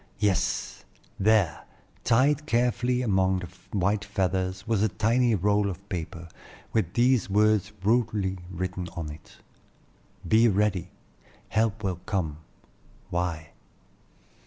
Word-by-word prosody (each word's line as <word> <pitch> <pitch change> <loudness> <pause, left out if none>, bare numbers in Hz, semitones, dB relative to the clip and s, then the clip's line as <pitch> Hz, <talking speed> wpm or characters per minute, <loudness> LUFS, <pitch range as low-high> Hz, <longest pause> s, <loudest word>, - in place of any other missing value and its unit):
Yes! 100 -3 0 0.4
there, 100 -5 +3 0.4
tied 145 +6 +3
carefully 125 0 +1
among 95 -4 +2
the 90 -2 -6 0.3
white 100 +3 +1
feathers, 95 -1 -1
was 110 -3 +1
a 110 - +3
tiny 115 +3 +2
roll 100 +1 +2
of 95 +2 -8
paper, 85 -2 -5 0.5
with 100 -6 0
these 120 -2 +3
words 105 0 +3
rudely 105 -4 +1
written 90 0 -4
on 80 -3 -4
it: 75 - -13 0.9
"Be 110 +5 +5
ready; 100 -3 +1 0.6
help 110 -1 0
will 95 -3 -1
come. 80 -7 -2 0.7
Y." 85 -3 -2
100 Hz, 110 wpm, -27 LUFS, 90-110 Hz, 0.9 s, Be